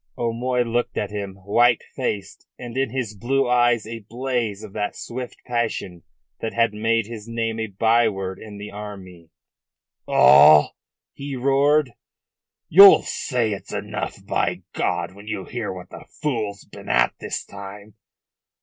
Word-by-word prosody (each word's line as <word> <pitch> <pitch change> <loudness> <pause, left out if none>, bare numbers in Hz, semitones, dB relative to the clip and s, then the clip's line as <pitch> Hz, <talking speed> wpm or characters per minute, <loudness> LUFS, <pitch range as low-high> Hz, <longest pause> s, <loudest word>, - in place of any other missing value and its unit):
O'Moy 120 +2 0
looked 120 +1 -2
at 105 -1 -2
him, 100 -2 -5
white 120 +3 +3
faced, 105 -7 -4
and 120 -1 -8
in 135 -1 0
his 115 -3 -4
blue 135 +6 0
eyes 120 -2 +3
a 115 +1 -6
blaze 115 -2 -3
of 105 -2 -10
that 105 -1 -3
swift 125 +1 -7
passion 115 -7 -3 0.4
that 115 - -4
had 115 -2 +2
made 115 +1 +1
his 110 -1 -9
name 115 -1 -2
a 110 - -2
byword 100 -2 +1
in 105 -2 -10
the 105 +1 -8
army. 95 -5 -10 0.8
"All?" 75 +3 +7 0.4
he 140 0 -6
roared. 140 +2 +2 0.8
"You'll 195 +4 +9
say 120 -5 -1
it's 100 - -6
enough, - - -5
by - - -1
God, - - -2
when 100 +2 -14
you 95 -3 -4
hear 120 -4 -4
what 90 -1 -10
the - - -11
fool's 110 -9 -2
been - - -12
at - - +3
this - - -4
time. 100 +1 -10
115 Hz, 150 wpm, -22 LUFS, 100-120 Hz, 0.8 s, You'll